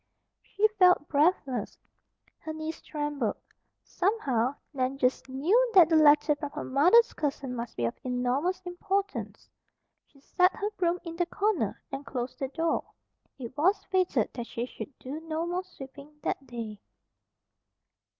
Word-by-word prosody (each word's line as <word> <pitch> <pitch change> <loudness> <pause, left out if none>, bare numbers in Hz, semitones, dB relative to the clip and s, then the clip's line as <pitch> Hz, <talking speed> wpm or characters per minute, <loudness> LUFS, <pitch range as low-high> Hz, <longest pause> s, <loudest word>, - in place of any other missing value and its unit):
She 420 +2 +2
felt 360 -5 +5
breathless. 280 - +1 0.6
Her 315 - -6
knees 315 +1 -5
trembled. 295 -8 -2 0.5
Somehow, 280 - 0 0.2
Nan 260 0 -1
just 260 0 0
KNEW 385 - +2
that 345 -4 +8
the 325 - +3
letter 300 0 +6
from 290 -1 -4
her - - -4
mother's 355 - +5
cousin 275 -3 -3
must 235 -1 -6
be 120 - 0
of 115 - -1
enormous 255 +9 0
importance. 385 +2 -3 0.6
She 280 - -23
set 360 +6 +2
her 415 +1 -2
broom 360 -4 0
in 335 -2 -7
the 350 -1 +1
corner 390 - -1
and 270 +1 -5
closed 250 -3 -5
the 270 - -1
door. 325 +4 -1 0.5
It 255 -1 -8
was 355 +8 +2
fated 360 - +1
that 240 -2 -5
she 235 - -3
should 255 +1 -9
do 275 +4 -6
no 320 0 -3
more 355 +2 -2
sweeping 285 -3 -12
that 270 - -3
day. 225 -4 -6
295 Hz, 150 wpm, -28 LUFS, 260-360 Hz, 0.6 s, that